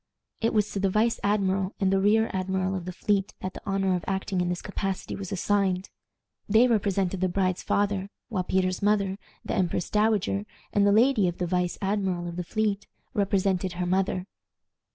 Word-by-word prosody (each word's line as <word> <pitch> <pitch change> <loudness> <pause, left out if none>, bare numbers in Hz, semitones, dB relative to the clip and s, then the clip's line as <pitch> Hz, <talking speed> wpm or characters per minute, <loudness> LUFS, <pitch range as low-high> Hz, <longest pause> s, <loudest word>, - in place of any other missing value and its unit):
It 230 - +1
was 210 -1 +1
to 200 - -2
the 195 0 +2
vice 220 +4 +2
admiral 195 -1 +1
and 195 -1 +2
the 195 - +3
rear 215 +3 +3
admiral 190 0 -1
of 185 -2 -4
the 185 - -4
fleet 195 +1 0
that 185 0 -4
the - - -9
honor 195 -1 +1
of 175 - -3
acting 190 -1 -1
in 175 - 0
this 180 0 -3
capacity 195 -2 -3
was 195 -1 -6
assigned. 195 -1 0 0.6
They 220 +4 +6
represented 195 -4 +1
the 185 - +2
bride's 185 0 0
father, 200 -1 0 0.2
while 205 -6 -1
Peter's 185 0 0
mother, 200 -1 +1 0.3
the - - -2
empress 180 -2 0
dowager, 210 -1 +1 0.3
and 205 0 +4
the - - +5
lady 220 -2 +4
of 175 - -2
the 180 - -1
vice 180 0 0
admiral 190 -3 0
of 170 - -6
the 180 - -3
fleet 205 +2 -1 0.3
represented 195 -2 +1
her 180 0 -2
mother. 185 0 0
195 Hz, 190 wpm, -27 LUFS, 185-205 Hz, 0.6 s, They